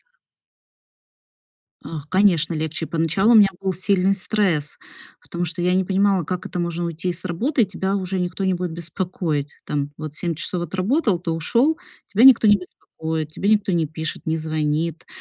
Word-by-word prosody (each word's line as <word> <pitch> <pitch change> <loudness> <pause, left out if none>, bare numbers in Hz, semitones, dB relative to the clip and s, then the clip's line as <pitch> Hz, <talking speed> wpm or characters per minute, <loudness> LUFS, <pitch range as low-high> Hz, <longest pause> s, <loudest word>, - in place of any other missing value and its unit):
Это - - -43 1.7
Ах, 150 -3 -7
конечно, 175 -4 +3
легче. 160 +1 -3
Поначалу 165 +7 +1
у - - +7
меня 210 -2 +8
был 190 -1 -1
сильный 190 +1 +2
стресс, 190 -7 -1 0.4
потому 175 0 -4
что 170 +1 -4
я 180 +1 +2
не 190 +1 +2
понимала, 195 0 +2
как 180 +3 -4
это 180 - -4
можно 170 0 -2
уйти 170 +2 -3
с 175 +2 -8
работы, 235 - +1
и - - 0
тебя 190 0 -2
уже 190 -1 -2
никто 180 +2 -3
не 190 - +2
будет 180 -1 -3
беспокоить. 165 -3 -3
Там 145 -1 -2
вот 155 -1 -6
7 165 +2 -2
часов 175 +3 -3
отработал, 190 - 0
ты 170 -1 -3
ушёл, 235 - +1 0.3
тебя 215 +4 +2
никто 255 -4 +8
не 205 0 +6
беспокоит, 160 -4 -6
тебе 195 +6 -2
никто 210 -2 +3
не 165 -3 +1
пишет, 160 +1 -6
не 160 0 +1
звонит, 155 +1 -2
175 Hz, 180 wpm, -22 LUFS, 160-195 Hz, 1.7 s, меня